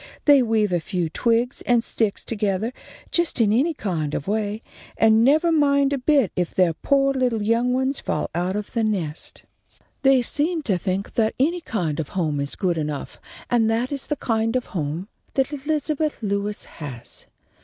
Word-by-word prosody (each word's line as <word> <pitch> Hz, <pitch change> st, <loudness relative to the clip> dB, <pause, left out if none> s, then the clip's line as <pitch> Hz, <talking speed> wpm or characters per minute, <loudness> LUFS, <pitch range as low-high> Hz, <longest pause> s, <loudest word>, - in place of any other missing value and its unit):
They 285 Hz, -2 st, +7 dB
weave 220 Hz, -4 st, +1 dB
a 175 Hz, -, +2 dB
few 175 Hz, 0 st, -2 dB
twigs 235 Hz, +4 st, +1 dB
and 240 Hz, -2 st, +4 dB
sticks 220 Hz, -4 st, 0 dB
togethah 215 Hz, +1 st, -1 dB, 0.4 s
just 340 Hz, -6 st, +1 dB
in 215 Hz, -2 st, +4 dB
any 300 Hz, +8 st, +2 dB
kind 160 Hz, -, -2 dB
of 140 Hz, -, -4 dB
way, 210 Hz, +1 st, -1 dB, 0.3 s
and 220 Hz, 0 st, +5 dB
nevah 310 Hz, +6 st, +4 dB
mind 280 Hz, -2 st, +3 dB
a 275 Hz, -, -1 dB
bit 275 Hz, -, +3 dB
if 180 Hz, -2 st, -2 dB
their 180 Hz, -3 st, +3 dB
poah 275 Hz, -, +2 dB
little 250 Hz, -5 st, 0 dB
young 230 Hz, +3 st, +2 dB
ones 260 Hz, +2 st, 0 dB
fall -, -, -2 dB
out 180 Hz, +3 st, -1 dB
of 210 Hz, -1 st, -5 dB
the 230 Hz, -2 st, +1 dB
nest. 180 Hz, -8 st, -3 dB, 0.6 s
They 270 Hz, -2 st, +5 dB
seem 310 Hz, +6 st, 0 dB
to 195 Hz, -9 st, 0 dB
think 190 Hz, +2 st, -2 dB
that 220 Hz, -1 st, +1 dB
any 335 Hz, +6 st, +1 dB
kind 170 Hz, -, -2 dB
of 150 Hz, -, -3 dB
home 155 Hz, -5 st, 0 dB
is 140 Hz, 0 st, -2 dB
good 175 Hz, -4 st, 0 dB
enough, 150 Hz, -2 st, -4 dB, 0.3 s
and 230 Hz, -2 st, +2 dB
that 235 Hz, +4 st, 0 dB
is 275 Hz, -2 st, -4 dB
the 295 Hz, -, 0 dB
kind 225 Hz, -2 st, 0 dB
of 255 Hz, -, 0 dB
a -, -, -19 dB
home 165 Hz, +1 st, -3 dB, 0.3 s
that 270 Hz, +2 st, +1 dB
Elizabeth 300 Hz, +1 st, -1 dB
Lewis 200 Hz, 0 st, -2 dB
has. 135 Hz, -7 st, -7 dB
225 Hz, 185 wpm, -23 LUFS, 185-270 Hz, 0.6 s, They